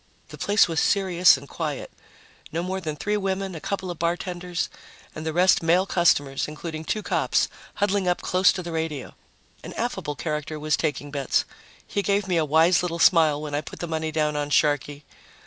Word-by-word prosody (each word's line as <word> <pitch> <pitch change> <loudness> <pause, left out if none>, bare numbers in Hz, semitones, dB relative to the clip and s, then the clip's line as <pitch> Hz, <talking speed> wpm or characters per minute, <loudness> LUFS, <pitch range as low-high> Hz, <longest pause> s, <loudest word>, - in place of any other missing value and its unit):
The - - -10
place 205 +2 +4
was 165 -2 -1
serious 180 -5 +4
and 140 +1 -12
quiet 150 -3 -4 0.6
no 165 +2 -2
more 190 +1 -3
than 155 -3 -4
three 210 +7 -1
women, 195 -1 -2
a 160 - -7
couple 190 -2 -3
of 175 - -8
bartenders, 175 +1 -2 0.5
and 155 +1 -6
the - - 0
rest 180 +3 +4
male 170 +3 +3
customers, 145 -7 +2
including 155 +1 -6
two 215 +4 -2
cops, - - +1 0.3
huddling 200 -2 0
up 180 - +1
close 185 0 +4
to 180 - -5
the 170 - -6
radio. 160 -4 -3 0.5
An - - -8
affable 150 - -3
character 150 0 -4
was 155 0 +1
taking 145 -2 -3
bets. 140 -2 0 0.4
He 200 - -2
gave 200 0 0
me 180 -2 +1
a 160 - +2
wise 160 +4 +4
little 175 -2 -2
smile 160 -4 +5
when 150 -1 -6
I 145 - 0
put - - -10
the - - -4
money 160 -1 -2
down 155 -1 0
on 145 0 -2
Sharkey. 145 0 +1
165 Hz, 195 wpm, -24 LUFS, 150-185 Hz, 0.6 s, smile